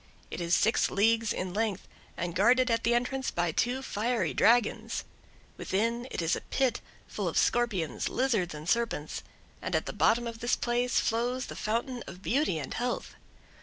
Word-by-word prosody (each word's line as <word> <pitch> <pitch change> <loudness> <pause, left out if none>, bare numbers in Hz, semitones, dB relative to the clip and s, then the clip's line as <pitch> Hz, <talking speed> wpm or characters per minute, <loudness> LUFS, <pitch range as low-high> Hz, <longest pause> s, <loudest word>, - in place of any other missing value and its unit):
It - - -4
is 170 +1 +2
six 220 - +3
leagues 225 +2 +2
in 185 -1 -3
length, 215 -2 -1 0.3
and 175 0 -2
guarded 245 +6 +4
at 230 - +1
the 235 - +3
entrance 255 +2 -1
by 175 -1 0
two 245 +10 0
fiery 220 - -1
dragons. 235 -1 +2 0.5
Within, 230 +5 -1
it - - -3
is 165 - +2
a - - -5
pit, 265 -3 0 0.2
full - - -4
of - - -2
scorpions, 210 -10 +1
lizards, 220 -10 0
and 150 +2 -8
serpents, 230 -9 -1 0.4
and - - -2
at - - +1
the - - -4
bottom 240 +1 +3
of 230 -1 -6
this 240 +1 +1
place 245 +1 +1
flows 245 +3 0
the - - -8
Fountain 240 +3 -2
of 180 +2 -10
Beauty 270 - +1
and 140 -4 -5
Health. 245 +1 -2
230 Hz, 175 wpm, -29 LUFS, 185-245 Hz, 0.5 s, guarded